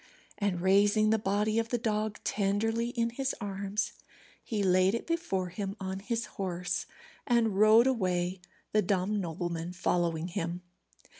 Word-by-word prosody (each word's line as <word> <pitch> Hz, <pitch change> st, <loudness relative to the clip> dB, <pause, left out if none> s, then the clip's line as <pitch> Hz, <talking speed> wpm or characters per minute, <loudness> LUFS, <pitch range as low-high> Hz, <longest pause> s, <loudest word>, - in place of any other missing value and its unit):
And 200 Hz, -4 st, 0 dB
raising 205 Hz, +3 st, +4 dB
the 220 Hz, -, +3 dB
body 210 Hz, +2 st, +1 dB
of 225 Hz, 0 st, -2 dB
the 245 Hz, -, +1 dB
dog 215 Hz, -2 st, -1 dB
tenderly 225 Hz, +4 st, 0 dB
in 235 Hz, -2 st, -1 dB
his 265 Hz, +2 st, -2 dB
arms, 200 Hz, 0 st, -2 dB, 0.5 s
he 215 Hz, -4 st, -2 dB
laid 185 Hz, +2 st, +4 dB
it 235 Hz, -, -4 dB
before 265 Hz, -, -1 dB
him 195 Hz, +2 st, -4 dB
on 190 Hz, 0 st, -4 dB
his 230 Hz, +3 st, -2 dB, 0.2 s
horse, 180 Hz, -1 st, -2 dB, 0.4 s
and 230 Hz, -5 st, +2 dB
rode 215 Hz, +3 st, +7 dB
away, 185 Hz, -7 st, 0 dB, 0.3 s
the 215 Hz, -, +3 dB
dumb 200 Hz, +2 st, 0 dB
nobleman 170 Hz, 0 st, -4 dB
following 170 Hz, -2 st, 0 dB
him. 170 Hz, +1 st, -3 dB
200 Hz, 145 wpm, -30 LUFS, 185-220 Hz, 0.5 s, rode